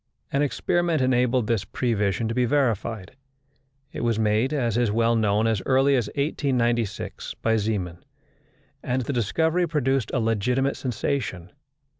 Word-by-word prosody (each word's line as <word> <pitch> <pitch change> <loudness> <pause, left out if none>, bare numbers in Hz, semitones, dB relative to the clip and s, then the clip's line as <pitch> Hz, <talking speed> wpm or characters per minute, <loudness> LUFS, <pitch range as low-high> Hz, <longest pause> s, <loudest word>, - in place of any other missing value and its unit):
An 140 - +1
experiment 170 +3 +1
enabled 125 -1 +2
this 110 -3 0
prevision 105 0 -1
to 115 - -2
be 125 +1 +2
verified. 115 -6 -1 0.8
It - - -5
was 115 -2 +1
made, 110 +4 +1
as 120 -7 0
is 120 -2 +2
well 115 +1 +2
known, 105 -1 +2
as 110 -3 +1
early 135 +1 +4
as 120 -5 0
1896 120 -7 -1
by 115 0 +3
Zeeman; 100 -6 -2 0.8
and 130 0 -1
the 140 - -3
discovery 160 - +1
produced 135 -6 0
a 130 - 0
legitimate 120 +5 0
sensation. 115 -7 -3
120 Hz, 140 wpm, -24 LUFS, 110-135 Hz, 0.8 s, early